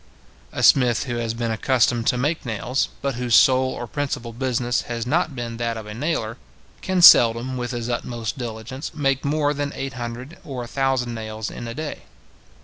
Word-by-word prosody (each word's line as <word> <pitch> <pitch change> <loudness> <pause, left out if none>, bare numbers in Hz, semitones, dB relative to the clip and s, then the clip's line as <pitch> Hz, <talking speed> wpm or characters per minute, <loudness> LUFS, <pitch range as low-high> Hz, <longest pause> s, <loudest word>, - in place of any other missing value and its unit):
A - - -3
smith 125 -4 +5
who 120 -3 -4
has 115 -1 -2
been 115 -1 -2
accustomed 120 0 +1
to 125 - +3
make 145 +6 -1
nails, 120 +3 -1
but 140 -1 0
whose 120 -2 +2
sole 130 0 +5
or 120 - -5
principal 130 -2 -4
business 125 0 -1
has 115 -1 -3
not 155 +2 0
been 120 -2 -5
that 115 -1 -2
of 110 - -7
a 105 - -7
nailer, 115 -3 -2 0.4
can 185 -2 0
seldom, 120 -1 +7
with 120 -1 -3
his 120 -2 -4
utmost 120 -1 -3
diligence, 120 +2 -6
make 135 -3 0
more 145 0 +1
than 145 0 -3
eight 135 0 -4
hundred 125 +5 -7
or 130 -3 -5
a - - -8
thousand 130 -2 0
nails 110 -1 -5
in 120 - -7
a 115 - -6
day. 155 0 -5
125 Hz, 190 wpm, -22 LUFS, 115-135 Hz, 0.4 s, seldom